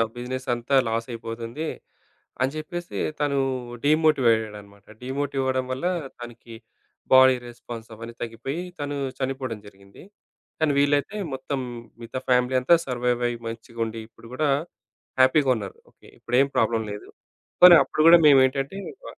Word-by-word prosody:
అవ్ 115 - +2
బిజినెస్సంతా 125 0 -3
లాసైయిపోతుంది 115 +4 -4 0.8
అని 130 - +2
జెప్పేసి 175 +3 -6 0.2
తను 145 -1 0 0.5
డీమోటివయ్యాడడనమాట. 115 -10 +1 0.2
డీమోటివవడం 130 0 -2
వల్ల 130 +7 -3 0.3
తనకి 120 -1 -11 0.6
బాడీ 130 0 +7
రెస్పాన్స్ 120 -1 -9
అవన్నీ 115 +1 -9
తగ్గిపోయి 125 +8 -5 0.2
తను 145 0 -3 0.2
చనిపోవడం 130 -4 -3
జరిగింది. 100 0 -16 0.6
కానీ, 155 -2 +2
వీళ్ళైతే 145 +6 +1 0.2
మొత్తం 135 +1 -4 0.4
మిగతా 115 +2 -6
ఫ్యామిలీ 125 +1 +2
అంతా 130 +7 +5
సర్వైవయ్యి 120 -1 -1
మంచిగుండి, 115 0 -5
ఇప్పుడు 115 0 -17
గూడా 150 +2 0 0.7
హ్యాపీగున్నారు. 130 -7 +2
ఓకే. - - -21
ఇప్పుడేం 130 +3 +2
ప్రాబ్లమ్ 110 0 +1
లేదు. 105 - -9 0.5
పోనీ 180 -1 +11
అప్పుడు - - -2
గూడా 170 +1 +10
మేమేంటంటే 135 +3 +3 0.3
బ - - -14
125 Hz, 115 wpm, -24 LUFS, 115-140 Hz, 0.8 s, పోనీ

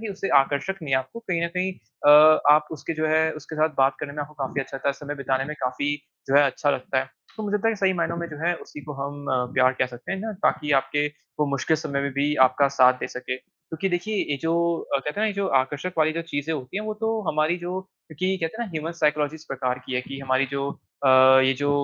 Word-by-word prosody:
कि, - - -5
उससे 195 0 -4
आकर्षक 140 +7 0
नहीं 140 - -4
है, - - +4
आपको 130 - -7
कहीं 170 -2 0
न - - -1
कहीं 185 +1 0
अ, 135 +2 0 0.4
आप 150 0 +3
उसके 160 +1 -5
जो 155 0 0
है, 160 +1 +3
उसके 155 +2 -9
साथ 155 +1 +2
बात 135 0 +4
करने 140 - -5
में 150 - -5
आपको 150 +1 -11
काफ़ी 135 +2 -3
अच्छा 135 - -6
लगता 135 - -2
है, - - +2
समय 145 +1 -6
बिताने 135 -1 -1
में 150 +2 -5
काफ़ी 135 +3 -1 0.3
जो 135 - +4
है 145 - +8
अच्छा 145 +2 0
लगता 130 0 -1
है। 130 0 -3 0.3
तो 220 - -5
मुझे 205 -1 -2
लगता 210 +2 0
है 225 - +1
सही 195 -2 +2
मायनों 170 0 0
में 170 0 -3
जो 150 - -9
है 175 - +2
उसी 150 - -10
को 150 - -6
हम 140 +1 -6
अ, 125 -1 +1
प्यार 130 0 +4
कह 130 - +2
सकते 125 +8 -7
हैं 195 - -2
ना 220 +1 -4
ताकी 150 0 +1
आपके 145 +2 -1 0.3
वो 150 - +3
मुश्किल 140 +3 +1
समय 140 -2 -3
में 140 0 -1
भी 145 +2 +1
आपका 140 +2 +2
साथ 130 -1 +6
दे - - -2
सके। 130 0 -5
क्योंकि 160 +7 -6
देखिए 180 +4 -2
ये 145 - +1
जो 165 0 +1 0.4
अ, - - +4
कहते 140 +2 -4
हैं 205 +8 -3
ना - - +3
ये 215 - 0
जो 200 0 -1 0.2
आकर्षक 145 +7 -5
वाली 155 0 +3
जो 165 +1 -3
चीज़ें 160 -1 -3
होती 130 +2 -6
हैं 210 - -2
वो 215 - -3
तो 225 0 0
हमारी 155 +3 +1
जो 180 +2 -4 0.4
कि 185 +1 +1
कहते 165 +7 -4
हैं - - -4
ना - - -10
ह्यूमन 160 +1 -3
साइकोलॉजिस्ट 150 -1 -1
प्रकार 125 -1 -2
की 130 - -4
है 125 - +1
कि 135 +1 -8
हमारी 130 0 +1
जो 140 0 -2 0.3
अ, - - +5 0.4
ये 130 - +4
जो 145 - +2
150 Hz, 265 wpm, -24 LUFS, 135-170 Hz, 0.4 s, है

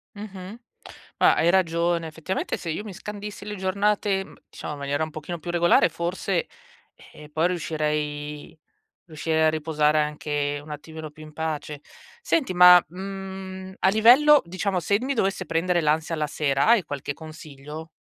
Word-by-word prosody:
Mh-mh. 200 +1 -9 0.6
Ma - - +5
hai 170 - +3
ragione 170 -2 +1
effettivamente 160 +4 -3
se 170 - -8
io 205 +7 -4
mi 205 - -7
scandissi 205 +2 -8
le 210 0 -5
giornate, 195 +1 0
mhmm, - - -15
diciamo 150 - -7
in - - -10
maniera 140 +2 -2
un 155 - -3
pochino 155 +3 -6
più 170 +2 -6
regolare 175 0 +4
forse, 175 +1 -2 0.7
eh, 150 0 -13
poi 160 +2 +2
riuscirei 150 -3 -3 0.5
riuscirei 160 0 0
a - - +5
riposare 155 -1 +1
anche 145 -1 -2
un 155 - -15
attimino 155 +1 -8
più 155 +1 -14
in 155 0 -11
pace. 155 -2 -4 0.4
Senti 330 - 0
ma, 180 0 +8
mhmm, 190 +1 -7
a 190 - +3
livello 250 +9 +6
diciamo 185 +1 -2
se 200 +6 +1
d - - -10
mi 275 +2 -1
dovesse 190 -5 -1
prendere 170 +2 +1
l'ansia 155 +2 0
la 155 -1 -1
sera, 140 -2 0
hai 230 -5 +6
qualche 145 -2 -5
consiglio? 155 -1 -10
170 Hz, 165 wpm, -24 LUFS, 150-190 Hz, 0.7 s, ma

